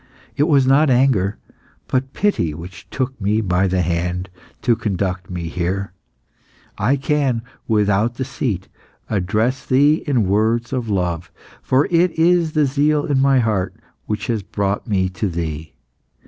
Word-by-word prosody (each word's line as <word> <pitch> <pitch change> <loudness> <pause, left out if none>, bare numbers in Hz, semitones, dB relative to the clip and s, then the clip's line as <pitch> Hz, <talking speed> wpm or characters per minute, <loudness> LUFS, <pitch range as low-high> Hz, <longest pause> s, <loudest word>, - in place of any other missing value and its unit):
It 145 - +2
was 140 -5 +4
not 140 +3 +4
anger, 120 -6 +2 0.5
but 130 0 -1
pity, 85 - 0
which 85 +2 -10
took 130 -2 -3
me 105 +2 +1
by 95 -2 +1
the 95 -1 +1
hand 90 +2 -2 0.3
to 120 - +3
conduct 95 -4 -2
me 90 -2 -4
here. 90 +3 -2 0.8
I 115 +8 +2
can, 135 -4 0 0.2
without 105 +1 +2
deceit, 120 -7 -3 0.4
address 110 +6 0
thee 145 +4 +3
in 125 -9 +2
words 110 +5 +1
of 125 -4 -2
love, 90 -4 -1 0.3
for 135 +3 +2
it 175 0 +2
is 165 -1 +3
the 150 -2 +3
zeal 145 +2 +1
in 140 -2 +1
my 135 0 +4
heart 105 -5 -1 0.3
which 105 0 -2
has 115 -2 -1
brought 100 +3 -2
me 95 -4 +1
to 90 +2 -2
thee. 80 -2 -5
110 Hz, 145 wpm, -20 LUFS, 95-135 Hz, 0.8 s, was